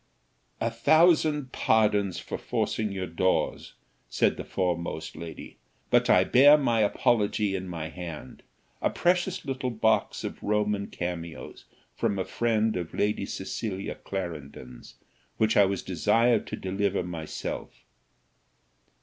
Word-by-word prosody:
"A 115 - 0
thousand 155 +2 +3
pardons 105 -4 +2
for - - -5
forcing 110 -2 -1
your 95 -1 -3
doors," 90 +2 -1 0.4
said - - +2
the - - -6
foremost 85 -3 -3
lady; 85 -1 -9 0.3
"but - - +4
I - - +6
bear 145 +4 +7
my 120 -6 +1
apology 105 -1 +1
in 95 0 -4
my 80 -3 -5
hand: 80 -6 -8 0.4
a - - +2
precious 180 0 0
little 135 -1 -2
box 110 -1 +1
of - - -6
Roman 105 -1 0
cameos 85 -2 -6 0.3
from 100 - 0
a 95 - -1
friend 110 -2 0
of 85 -2 -5
Lady 105 -1 0
Cecilia 95 0 -4
Clarendon's, 75 -9 -7 0.4
which 110 0 +2
I 100 - +7
was 95 -1 -2
desired 115 -1 +2
to - - -4
deliver 95 0 -1
myself." 85 -3 -6
100 Hz, 125 wpm, -27 LUFS, 90-115 Hz, 0.4 s, bear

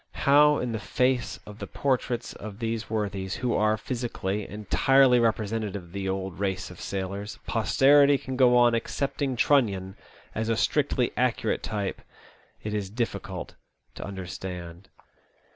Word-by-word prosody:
How 150 +1 +6
in 125 - -2
the 110 - -2
face 125 -5 0
of 105 +1 -11
the - - -5
portraits 125 -3 -1
of 100 -1 -9
these 115 -1 -3
worthies, 100 -3 -2
who 125 -1 -1
are, 110 0 +2
physically, 105 -4 -3
entirely 125 +5 +4
represen 115 -1 +1
tative 105 -2 -4
of 90 -4 -8
the 95 0 -3
old 95 -1 -4
race 95 -2 -2
of 90 - -12
sailors, 100 +2 -4
posterity 140 +5 +5
can 130 0 -6
go 125 -1 +5
on 120 -1 +5
accepting 135 +3 -1
Trunnion 100 -8 +2 0.4
as 110 +1 -2
a 115 - +1
strictly 140 -3 +1
accurate 125 0 0
type 100 -3 -3 0.6
it 105 - -3
is 100 -3 -2
difficult 100 -5 -4 0.4
to - - -7
understand. 90 -1 -7
110 Hz, 145 wpm, -27 LUFS, 95-125 Hz, 0.6 s, How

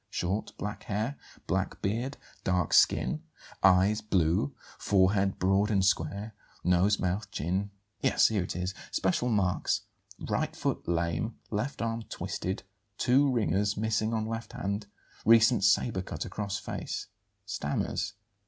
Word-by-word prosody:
Short; 95 +5 -2
black 105 +1 -5
hair; 110 +7 -1 0.3
black 95 +3 -1
beard; 120 +8 -1 0.3
dark 90 -3 +1
skin; 155 - +4 0.4
eyes, 95 +3 +5
blue; 85 -8 +1 0.2
forehead, 95 0 +3
broad 95 +3 +2
and 100 -3 +3
square; 100 +4 0 0.3
nose, 90 +4 +3
mouth, 95 +4 -1
chin 95 +6 -1 0.2
' 105 - -46
Yes, - - +4
here 105 -3 +1
it 90 - -4
is: 90 +1 -2 0.2
'Special 95 +6 +1
marks: 100 -5 +1 0.4
right - - -1
foot - - -2
lame; 85 +6 0 0.2
left 125 +5 -2
arm 115 0 -1
twisted; 95 +2 -3 0.3
two 135 +3 +4
ringers 105 -3 +1
missing 110 +1 0
on 110 -1 0
left 115 +1 -5
hand; 105 -3 -3 0.4
recent 115 -1 +6
sabre 100 -1 +3
cut - - -5
across 100 -1 -3
face; - - -4 0.4
stammers.' 75 +5 -2
100 Hz, 135 wpm, -29 LUFS, 95-110 Hz, 0.4 s, recent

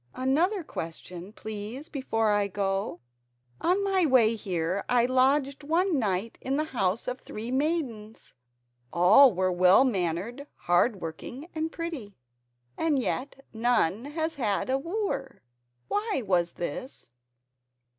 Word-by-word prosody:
"Another 330 +10 +1
question, 175 - -7
please, 220 +6 -7
before 225 -6 0
I 205 -1 +2
go. 195 -2 -2 0.6
On 375 +3 +2
my 385 -2 +2
way 250 -7 +5
here 185 -4 -2
I 245 -1 +4
lodged 265 +2 +2
one 330 +1 +1
night 205 0 -2
in 270 +2 -1
the 305 - +1
house 220 -8 -1
of 250 +1 -3
three 225 +3 -6
maidens. 260 -7 -2 0.6
All 210 +10 +7
were 185 0 0
well 180 +7 +5
mannered, 205 - -2
hard 180 +4 +1
working, 245 - -7
and 320 0 -2
pretty, 310 - -6 0.6
and 315 -3 +1
yet 270 +2 -3
none 225 -2 +1
has 320 +2 -2
had 210 +3 0
a 265 - +2
wooer. 330 - -3 0.4
Why 415 - -1
was 175 -3 +1
this?" 175 - -6
245 Hz, 125 wpm, -27 LUFS, 195-285 Hz, 0.6 s, All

